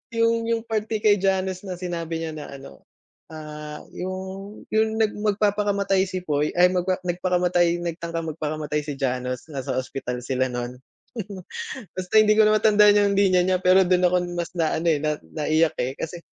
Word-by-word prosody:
yung 230 Hz, 0 st, +3 dB
yung 230 Hz, -1 st, 0 dB
parte 220 Hz, -1 st, -2 dB
kay 205 Hz, -2 st, +5 dB
Janus 190 Hz, 0 st, 0 dB
na 180 Hz, -, -4 dB
sinabi 170 Hz, -2 st, -4 dB
niya 160 Hz, -1 st, -3 dB
na 150 Hz, -2 st, -7 dB
ano, 135 Hz, 0 st, -13 dB, 0.5 s
ah, 150 Hz, -1 st, -8 dB
yung 190 Hz, +2 st, -6 dB
yung 220 Hz, 0 st, +2 dB
nag 215 Hz, -, +3 dB
magpapakamatay 200 Hz, -2 st, +1 dB
si 185 Hz, -1 st, -4 dB
Poy, 150 Hz, -2 st, 0 dB
ay 180 Hz, +1 st, +5 dB
magpa 185 Hz, 0 st, 0 dB
nagpakamatay, 175 Hz, -1 st, +1 dB
nagtangkang 165 Hz, -1 st, -4 dB
magpakamatay 150 Hz, -1 st, -2 dB
si 145 Hz, -2 st, -4 dB
Janus, 125 Hz, +1 st, -3 dB
nasa 135 Hz, -2 st, -3 dB
ospital 125 Hz, -1 st, -4 dB
sila 130 Hz, 0 st, 0 dB
nun. 125 Hz, 0 st, -5 dB, 1.2 s
Basta 185 Hz, +1 st, -6 dB
hindi 215 Hz, 0 st, +5 dB
ko 220 Hz, -, +6 dB
na 215 Hz, 0 st, +4 dB
matandaan 210 Hz, -1 st, +5 dB
yung 200 Hz, -1 st, +2 dB
linya 185 Hz, -2 st, +4 dB
niya, 185 Hz, 0 st, +2 dB
pero 185 Hz, +1 st, +5 dB
dun 180 Hz, 0 st, +3 dB
ako 180 Hz, -, +1 dB, 0.2 s
mas 170 Hz, -1 st, -3 dB
na 160 Hz, -2 st, +1 dB
ano, 170 Hz, +2 st, -2 dB
eh, 150 Hz, -, +1 dB
na 150 Hz, 0 st, 0 dB
naiyak, 155 Hz, +1 st, 0 dB
eh, 130 Hz, +2 st, -1 dB
kasi 170 Hz, +2 st, -6 dB
180 Hz, 175 wpm, -24 LUFS, 155-195 Hz, 1.2 s, ko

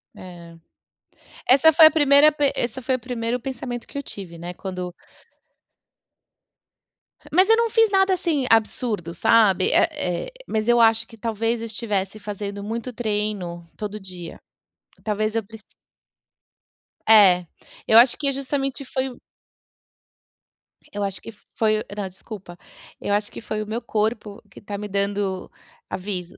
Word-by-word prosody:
Eh. 170 Hz, -2 st, -12 dB, 0.9 s
Essa 280 Hz, +5 st, +6 dB
foi 320 Hz, +1 st, +8 dB
a -, -, +3 dB
primeira 290 Hz, 0 st, +6 dB
pen 290 Hz, -2 st, +1 dB
esse 245 Hz, +2 st, -3 dB
foi 260 Hz, +1 st, 0 dB
o -, -, -4 dB
primeiro 240 Hz, 0 st, -3 dB
pensamento 245 Hz, -1 st, -6 dB
que -, -, -9 dB
eu 280 Hz, -, -3 dB
tive, 180 Hz, -7 st, -8 dB
né, 175 Hz, +2 st, -7 dB
quando 180 Hz, -1 st, -6 dB, 2.4 s
Mas 370 Hz, +6 st, +4 dB
eu 450 Hz, -, +6 dB
não 465 Hz, 0 st, +2 dB
fiz 450 Hz, 0 st, +4 dB
nada, 385 Hz, -1 st, +3 dB
assim, 330 Hz, -7 st, 0 dB
absurdo, 215 Hz, -5 st, +1 dB
sabe. 195 Hz, -1 st, +4 dB
Eh 330 Hz, -, +4 dB, 0.4 s
eh, -, -, -10 dB, 0.2 s
mas 220 Hz, 0 st, -1 dB
eu 240 Hz, 0 st, +4 dB
acho 225 Hz, 0 st, +4 dB
que 225 Hz, -, -15 dB
talvez 225 Hz, +1 st, -2 dB
eu -, -, -4 dB
estivesse 210 Hz, -2 st, -3 dB
fazendo 200 Hz, -1 st, -6 dB
muito 230 Hz, +4 st, -4 dB
treino 205 Hz, -7 st, -3 dB
todo 210 Hz, 0 st, -5 dB
dia. 180 Hz, -3 st, -9 dB, 0.7 s
Talvez 215 Hz, 0 st, -1 dB
eu 225 Hz, -, 0 dB
precis 220 Hz, +1 st, -14 dB, 1.5 s
é, 190 Hz, -5 st, +7 dB, 0.4 s
eu 220 Hz, -, +6 dB
acho 240 Hz, +2 st, +6 dB
que 280 Hz, -2 st, 0 dB
justamente 275 Hz, 0 st, -3 dB
foi 260 Hz, +1 st, -2 dB
o 245 Hz, -, -13 dB, 1.7 s
eu 205 Hz, 0 st, -3 dB
acho 195 Hz, -1 st, -3 dB
que 225 Hz, -, -9 dB, 0.2 s
foi 215 Hz, -1 st, +2 dB
o -, -, -5 dB
não, 205 Hz, -2 st, -3 dB
desculpa, 185 Hz, -2 st, -11 dB, 0.4 s
eu 205 Hz, -, -1 dB
acho 205 Hz, 0 st, -1 dB
que -, -, -9 dB
foi 215 Hz, -1 st, -4 dB
o -, -, -12 dB
meu 225 Hz, +3 st, -3 dB
corpo 215 Hz, -1 st, -2 dB
que -, -, -14 dB
tá 205 Hz, 0 st, -6 dB
me 210 Hz, +1 st, -5 dB
dando 200 Hz, -1 st, -2 dB, 0.4 s
aviso, 185 Hz, -2 st, -5 dB
220 Hz, 150 wpm, -23 LUFS, 200-255 Hz, 2.4 s, foi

